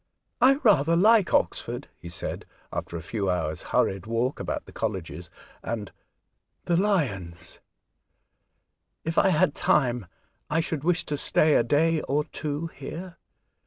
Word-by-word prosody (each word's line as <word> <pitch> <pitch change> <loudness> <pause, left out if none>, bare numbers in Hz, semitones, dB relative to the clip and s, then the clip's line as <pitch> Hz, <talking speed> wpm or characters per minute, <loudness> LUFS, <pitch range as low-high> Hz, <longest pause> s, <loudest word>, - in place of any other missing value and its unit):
" - - -50
I 260 +2 +7
rather 170 - +4
like 205 0 +5
Oxford," - - 0
he 85 - -9
said, 85 - -6 0.3
after 85 - -4
a 80 - -8
few 100 +1 -2
hours' 80 -4 -1
hurried 95 +1 0
walk 115 +4 -1
about - - -3
the - - -13
colleges 90 -5 -4 0.3
and 105 -5 -4 0.7
"the 175 - +2
lions 105 - -1 0.5
"; - - -50
*' - - -54
If 165 +1 +1
I - - +4
had 175 -2 +3
time 120 -7 +1 0.4
I 160 - +1
should 160 -3 -2
wish 180 +1 +1
to 145 - -2
stay 155 +2 +3
a - - +5
day 155 +5 +2
or 145 +2 0
two 150 0 -4
here. 170 +6 -8
145 Hz, 155 wpm, -26 LUFS, 100-165 Hz, 0.7 s, I